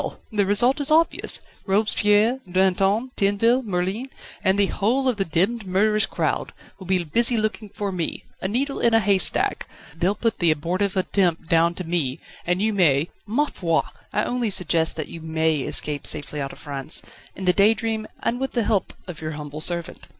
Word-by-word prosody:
the 205 -3 +1
result 240 +7 +3
is 285 - +1
obvious. 320 +2 +3 0.3
Robespierre, 210 +3 +2
Danton, 195 +6 +2
Tinville, 215 +5 +2
Merlin, 195 +5 -2 0.3
and 190 0 +3
the 200 - +4
whole 240 +8 0
of 250 -4 +1
the 195 - 0
demmed 195 +7 0
murderous 210 +3 +2
crowd, - - -2 0.3
will 190 - -10
be 185 -1 +1
busy 235 +9 +3
looking 215 0 -2
after 200 0 -4
me 175 -3 -4 0.2
a - - 0
needle 270 +7 -1
in 235 -1 +3
a - - +6
haystack. 200 -3 +1 0.3
They'll 180 +5 0
put 230 0 -1
the 170 - +3
abortive 180 +6 -1
attempt 180 -3 0
down 170 +1 +3
to 185 - -5
me, 160 -6 -2 0.3
and 180 +3 +1
you 220 0 +1
may 160 -5 +2 0.2
ma 260 +8 +1
foi! 165 - 0 0.3
I - - 0
only 245 -2 -1
suggest 165 -4 +1
that 155 - -4
you 165 - -9
may 160 0 0
escape 145 +2 +1
safely 150 0 -1
out 135 0 -4
of - - -12
France 140 +1 -1 0.3
in 190 - -6
the 180 - +4
Daydream, 220 +2 +2 0.2
and 245 - -1
with 265 0 -3
the 235 - +1
help 205 -2 -1
of 180 -4 -9
your 155 0 -4
humble 150 0 -7
servant." 170 0 -1
195 Hz, 185 wpm, -23 LUFS, 170-220 Hz, 0.3 s, a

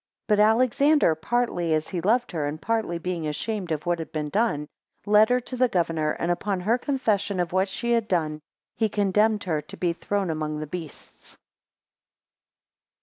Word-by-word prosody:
6 - - -60
But 210 -1 +4
Alexander, 255 - +4
partly 175 -2 0
as 155 0 -2
he 175 - -3
loved 235 +7 +1
her, 155 -5 -2
and 150 +2 -4
partly 220 -6 -1
being 170 -2 -3
ashamed 185 +4 -3
of 155 -1 -2
what 175 -1 0
had 160 - -6
been 150 -1 -3
done, 195 -7 0 0.4
led 210 +1 +5
her 250 0 +3
to 255 - -7
the 255 0 +3
governor, 165 -6 0
and 170 - -1
upon 185 +2 -1
her 225 +7 +1
confession 215 -8 0
of 175 -1 -1
what 190 +1 +2
she 235 +5 -3
had 230 -2 +2
done, 155 -5 -1 0.3
he 220 -2 +1
condemned 210 +1 +2
her 160 -5 -1
to 200 +5 -12
be 175 -2 0
thrown 195 +1 -2
among 155 -1 -3
the 155 - -4
beasts. 160 -1 -10
185 Hz, 185 wpm, -25 LUFS, 160-220 Hz, 0.4 s, led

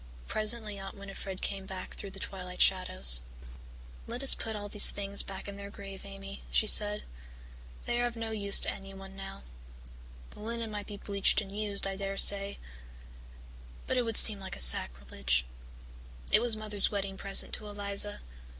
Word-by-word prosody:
Presently 215 -1 0
Aunt 195 +1 -10
Winnifred 195 -1 -9
came 195 -1 -5
back 190 -2 -8
through 200 - -9
the 195 - -11
twilight 180 -2 -8
shadows. 65 - +2 0.9
"Let 240 +3 -6
us 270 - +7
put 220 -1 -6
all 205 0 -7
these 210 0 +6
things 200 0 -2
back 195 0 -9
in 200 0 -8
their 200 0 -9
grave, 195 -1 -10
Amy," 195 0 -10
she - - +1
said. 210 0 +4 0.8
"They 240 0 -2
are 245 - 0
of 240 - -8
no 225 -1 -6
use 200 -2 +5
to - - +4
anyone 195 0 -12
now. 195 - -10 0.9
The - - -14
linen 230 +1 -5
might 205 -1 -7
be 205 - -9
bleached 200 -1 0
and 200 -1 -8
used, 205 -2 -2
I 195 0 -4
dare 195 0 -5
say 200 0 +4 1.3
but 260 - -3
it 250 - +1
would 225 -2 -2
seem 210 -3 +8
like 190 -1 -8
a - - -11
sacrilege. 65 0 +2 0.9
It - - +6
was 235 -2 +2
Mother's 210 -2 +3
wedding 195 -1 -4
present 195 0 0
to 215 - -2
Eliza. 205 0 +1
200 Hz, 175 wpm, -29 LUFS, 195-210 Hz, 1.3 s, seem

